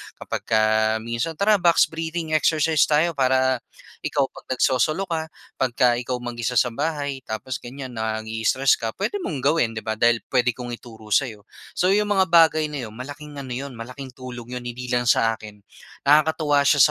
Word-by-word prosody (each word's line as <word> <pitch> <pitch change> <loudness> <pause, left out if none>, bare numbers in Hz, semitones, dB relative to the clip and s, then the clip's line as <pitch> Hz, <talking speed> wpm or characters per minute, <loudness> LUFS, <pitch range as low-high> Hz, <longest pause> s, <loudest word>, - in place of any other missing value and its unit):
kapagka 110 0 +1
minsan 120 +8 -3
"Tara, 205 +4 +3
box 175 -2 +4
breathing 160 0 -4
exercise 155 -1 +3
tayo. 155 +3 +3
Para 130 -3 +2 0.4
ikaw, 140 -2 -1
'pag - - -14
nagsosolo 140 +8 +2
ka, 160 -3 -3 0.3
pagka 120 -1 +2
ikaw 125 +1 -3
mag-isa 120 0 -3
sa 120 +1 +3
bahay, 145 +1 -2
tapos 125 +4 -4
ganyan 130 0 -8
naii-stress 110 +4 +1
ka, 115 -1 -4
pwede 410 - -2
mong 140 -4 -3
gawin." 140 -5 +2
Di 110 - -5
ba, 110 +1 -3
dahil 120 0 +3
pwede 125 -1 +2
kong 120 +1 -7
ituro 110 -3 -14
sa'yo. 110 -1 +1 0.3
So, 180 - +1
'yong 210 +2 +3
mga 190 -2 +4
bagay 160 -2 +5
na 145 -5 -4
'yon, 110 - -10
malaking 145 +5 -9
ano 130 - -9
'yon, 135 +2 -5
malaking 125 +3 -9
tulong 125 -1 -9
'yon, 125 - -4
hindi 125 +1 -6
lang 120 -1 +1
sa 115 -1 +4
akin. 105 -2 -11 0.5
Nakakatuwa 150 0 +4
siya 140 +1 +4
130 Hz, 175 wpm, -23 LUFS, 120-155 Hz, 0.5 s, bagay